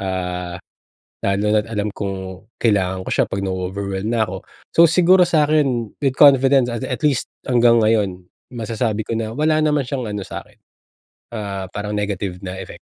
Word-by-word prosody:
ah, 90 -2 -3 0.6
lalo 100 +2 0
na't 110 +1 +1
alam 105 -2 -2
kong 95 0 -6
kailangan 95 -4 0
ko - - -5
siya - - +2
pag 100 0 -3
nao-overwhelm 95 +2 -3
na 110 - +3
ako. 95 -1 -6 0.3
So, 170 0 +6
siguro 180 +2 +5
sa'kin 150 -8 +2
with 135 -2 0
confidence, 135 -3 +5
ah, 120 - -3
at 130 +3 -4
least 140 -4 +1 0.2
hanggang 120 -2 +4
ngayon 100 -5 +1 0.2
masasabi 110 -2 -2
ko 115 - -5
na 110 0 -3
wala 155 +1 +2
naman 150 -3 +1
siyang 125 -4 -4
ano 105 -2 -4
sa'kin, - - -9 0.8
ah, 100 -4 -5
parang 105 +1 -4
negative 100 -2 -3
na 95 0 -6
effect. - - -9
110 Hz, 165 wpm, -20 LUFS, 95-130 Hz, 0.8 s, So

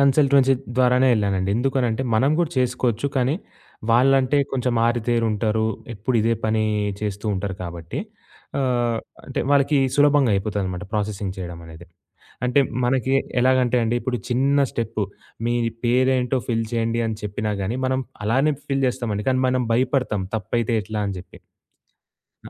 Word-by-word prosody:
Consultancy 140 -1 +4 0.2
ద్వారానే 125 +1 +4
ఎళ్ళానండి. 100 -2 0
ఎందుకనంటే, 125 -1 0
మనం 135 +6 +3
గూడా 170 -3 +1
చేసుకోవచ్చు. 125 0 0
కానీ 130 +3 +2 0.6
వాళ్ళంటే, 135 +3 +4
కొంచెం 125 -2 0
ఆరితేరుంటారు, 110 -2 +1 0.3
ఎప్పుడు 115 +4 -1
ఇదే 115 +1 +2
పని 110 0 +1 0.4
చేస్తుంటారు 100 -2 -3
కాబట్టి, 85 -1 -6 0.6
ఆహ్, 120 -3 +1 0.3
అంటే - - -3
వాళ్ళకి 140 0 +4 0.2
సులభంగా 145 -4 +4
అయిపోతుందనమాట 95 -2 -2
ప్రాసెసింగ్ 100 -2 -2
చేయడమనేది. 85 -1 -8 0.6
అంటే 125 +3 +3 0.3
మనకి 130 +1 +1 0.3
ఎలాగంటే 125 -1 +3
అండి, 115 +2 0
ఇప్పుడు 125 -1 -2
చిన్న 135 +3 +2
స్టెప్పు, 115 -2 -2 0.4
మీ 120 - +1 0.3
పేరేంటో 130 +1 +2
ఫిల్ 115 -1 0
చేయండి 115 0 0
అని 110 - -2
చెప్పినా 105 +1 -2
గానీ, 110 +7 -2
మనం 130 0 0 0.2
అలానే 135 +7 +2
ఫిల్ 135 -1 0
జేస్తామండి. 110 -4 -2
కానీ 130 0 +1
మనం 130 0 +1
భయపడతాం 125 -5 +1
తప్పైతే 115 +3 -1
ఎట్లా 105 +1 -3
అని 100 -1 -3
జెప్పి. 90 - -14 1.0
అ - - -10
120 Hz, 130 wpm, -22 LUFS, 105-130 Hz, 1.0 s, Consultancy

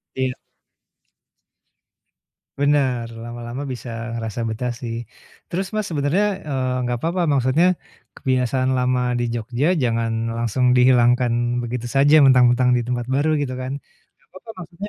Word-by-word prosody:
Iya. 130 -1 -1 2.3
Bener, 140 -4 +1 0.2
lama-lama 120 +2 -6
bisa 125 0 -8 0.3
ngerasa 115 0 -4
betah 120 +3 -3
sih. 115 -2 -4 0.5
Terus, 190 +3 -2
Mas, 215 -1 -1
sebenarnya, 155 +6 +1 0.2
eee, 130 -2 -1
enggak 120 -1 -2
papa 175 +2 0
maksudnya, 135 +5 +3 0.5
kebiasaan 130 0 0
lama 125 0 +1 0.2
di 120 - 0
Jogja 120 +4 -2 0.2
jangan 115 -1 0 0.3
langsung 120 +2 +1
dihilangkan 125 -1 +4 0.3
begitu 120 0 -4
saja, 140 +4 +3
mentang-mentang 125 -2 +5
di 120 - 0
tempat 120 0 -3
baru 145 +3 +1
gitu 130 -3 -2
kan. 130 +1 -5 0.5
Enggak - - -35
papa 185 +4 -11
maksudnya, 175 +4 -8
125 Hz, 130 wpm, -21 LUFS, 120-140 Hz, 2.3 s, mentang-mentang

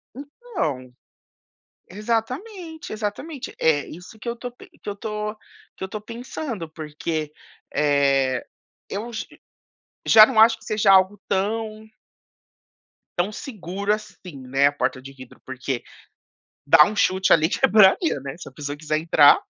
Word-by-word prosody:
Então, 275 - -5 1.0
exatamente, 260 - -4
exatamente. 235 +7 -5
É 150 -3 +2
isso 180 +6 -12
que 240 - -10
eu 235 - -3
tô 245 +1 -7
pen 245 - -16
que - - -6
eu 200 - -4
tô 210 0 -4 0.4
que - - -8
eu - - -3
tô 210 +1 -6
pensando, 230 - -6
porque, 155 0 -4 0.4
eh, 140 -3 +2 0.4
eu 220 +4 -5
j 220 - -5 0.8
já 215 -1 +9
não 225 -3 0
acho 225 0 +7
que 225 - -19
seja 210 -2 +3
algo 190 +1 +4
tão 215 +2 -2 1.3
tão 185 +4 0
seguro, 200 - -4
assim, 190 -8 -5
né, 135 +2 +3
a - - +2
porta 135 -2 -2
de 135 +1 -10
vidro, 130 -2 -14
porque, 130 -1 -4 0.8
dá 150 - +8
um 210 +4 -4
chute 190 -1 +3
ali: 160 0 +5
quebradeira, 200 - +4
né. 135 0 -6
Se - - -9
a - - -17
pessoa 145 -1 -5
quiser 155 0 -1
entrar, 155 -3 +6
200 Hz, 145 wpm, -23 LUFS, 150-225 Hz, 1.3 s, já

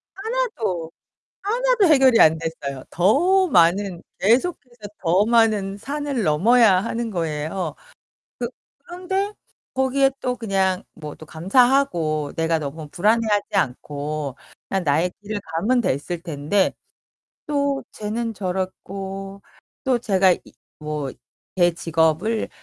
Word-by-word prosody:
하나도, 385 - -2 0.5
하나도 480 +1 +2
해결이 265 -6 +5
안 160 0 +6
됐어요. 140 -5 -5
더 345 - +3
많은 180 - +3 0.2
계속해서 240 - 0
더 185 +4 +3
많은 215 -4 +2
산을 280 -1 -3
넘어야 195 +6 +5
하는 230 0 -3
거예요. 160 -1 -3 0.6
그 240 -1 -2 0.4
그런데 380 +3 -2 0.4
거기에 265 +1 +2
또 250 0 -1
그냥 195 -5 0
뭐 150 -2 -8
또 155 - -12
감사하고 170 - +2
내가 165 0 +1
너무 150 +1 -6
불안해하지 210 +2 +1
않고 145 -2 -2 0.3
그냥 190 -2 0
나의 160 +4 +2
길을 205 0 -4 0.2
가면 240 +8 +2
됐을 165 - -2
텐데 165 +4 0 0.7
또 280 -2 0
쟤는 225 +2 -3
저렇고 195 +1 -5 0.4
또 255 -2 +2
제가 190 -5 +3
이 - - -3 0.4
뭐 150 -2 -3 0.5
제 175 -1 +4
직업을 165 +7 +1
195 Hz, 230 characters per minute, -22 LUFS, 165-250 Hz, 0.7 s, 안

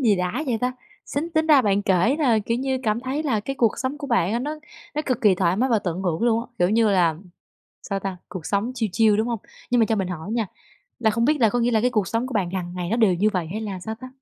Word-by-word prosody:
Gì 210 -5 +4
đã 180 +11 -1
vậy 235 -3 0
ta? 250 0 0 0.3
Sính 315 +5 -3
tính 315 0 +1
ra 290 -5 +6
bạn 200 -1 +2
kể 200 - +2
là, 245 -8 +3
kiểu 230 +3 -1
như, 265 0 -1
cảm 215 +1 0
thấy 265 +4 -2
là 245 -8 0
cái 275 +6 -5
cuộc 230 -4 +2
sống 260 +4 -3
của 285 - -5
bạn 225 -7 +1
á 235 - +1
nó 300 +4 -4 0.4
nó 300 - -1
cực 255 -2 0
kỳ 205 -4 +5
thoải 180 -1 +1
mái 255 +5 +1
và 225 - +4
tận 180 -1 -3
hưởng 175 +2 -1
luôn 230 -1 +3
á. 235 - -8
Kiểu 175 +1 +3
như 220 0 +3
là, 170 -5 +3 0.7
sao 195 0 -3
ta, 195 -2 -4
cuộc 175 -5 -7
sống 210 +5 0
chill 225 -4 -1
chill, 215 -1 +4
đúng 220 +3 0
hông? 230 -2 -1 0.3
Nhưng 245 - +3
mà 220 - +4
cho 225 - 0
mình 190 -3 -1
hỏi 180 +3 -5
nha, 230 -2 0 0.5
là 220 - +3
không 230 +2 +1
biết 300 +1 +3
là 225 - +6
có 245 - 0
nghĩa 240 +1 +2
là 220 -2 +2
cái 250 - +3
cuộc 210 -6 0
sống 230 +3 -1
của 260 - -7
bạn 190 -5 0
hằng 180 -2 -4
ngày 175 0 -3
nó 230 - 0
đều 215 -6 +4
như 205 +5 +2
vậy 175 -3 -1
hay 215 +3 -3
là 200 -4 -4
sao 220 +4 -5
ta? 255 +3 -10
220 Hz, 300 wpm, -23 LUFS, 195-250 Hz, 0.7 s, ra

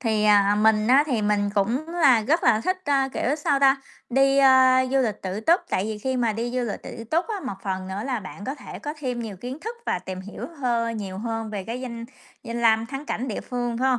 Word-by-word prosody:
Thì, 220 -3 +1
à, 205 -1 +5
mình 215 0 +4
á 265 +5 +5
thì 240 -7 0
mình 205 -1 +1
cũng 235 +10 0
là 285 -10 +4
rất 310 +10 +1
là 215 -2 +4
thích, 370 +10 0
ơ, 275 -2 +2
kiểu, 275 +5 0
sao 290 -2 +1
ta, 270 0 +4 0.3
đi, 270 +2 +3
ơ, 260 -1 +6
du 270 - +2
lịch 225 -6 -1
tự 190 +3 -3
túc, 335 - +4
tại 185 - 0
vì 215 -1 -4
khi 260 +4 -2
mà 235 -3 +1
đi 230 +3 -3
du 255 +1 -1
lịch 210 -4 -5
tự 230 - -8
túc 320 +10 0
á, 440 - -2
một 200 - -3
phần 190 -1 -3
nữa 195 +2 -4
là 250 -4 -1
bạn 195 +1 -9
có 270 - -3
thể 275 - -10
có 295 +1 -5
thêm 250 -4 -3
nhiều 220 -4 -6
kiến 250 +8 -7
thức 455 +6 -6
và - - 0
tìm 185 +1 -7
hiểu 200 +2 -7
hơ 235 -3 +1
nhiều 200 -4 -5
hơn 225 -1 -4
về 200 -3 -5
cái 235 +4 -5
danh 235 -2 -6 0.4
danh 235 0 -4
lam 225 0 +4
thắng 275 +3 -7
cảnh 255 +4 -3
địa 215 - -3
phương, 245 -2 -3
phải 260 +2 +2
hông? 255 -2 +2
235 Hz, 260 wpm, -24 LUFS, 215-270 Hz, 0.4 s, ơ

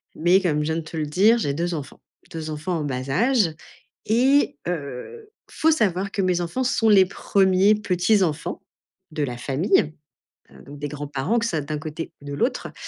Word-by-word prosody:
mais 175 +4 +3
comme 160 -5 0
je - - -1
viens 160 - -1
de 165 - -2
te 165 +1 -8
le 155 - -1
dire 205 +9 +4
j'ai 140 -8 -1
2 170 +3 -2
enfants, 145 -3 -8 0.3
2 160 -1 -5
enfants 155 +4 -3
en - - -3
bas 130 -1 -4
âge 210 - +2 0.5
et 255 - +3
heu, 170 - -6 0.2
faut 320 - +2
savoir 195 - +1
que 200 - -1
mes 180 -1 +1
enfants 175 +10 -2
sont 225 -2 +2
les 195 -3 +7
1ers 195 +1 +3
petits-enfants, 180 -4 0 0.5
de 155 - -4
la 125 -3 -3
famille. 150 - +1 0.6
Heu, - - -16
donc 145 +1 -11
des 145 - -3
grands-parents 145 - -2
que 230 - -2
ce - - 0
soit 160 - -1
d'un 150 +1 -4
côté 155 +1 -6
ou 145 - -14
de 145 - -5
l'autre 140 - -2
175 Hz, 195 wpm, -23 LUFS, 150-205 Hz, 0.6 s, les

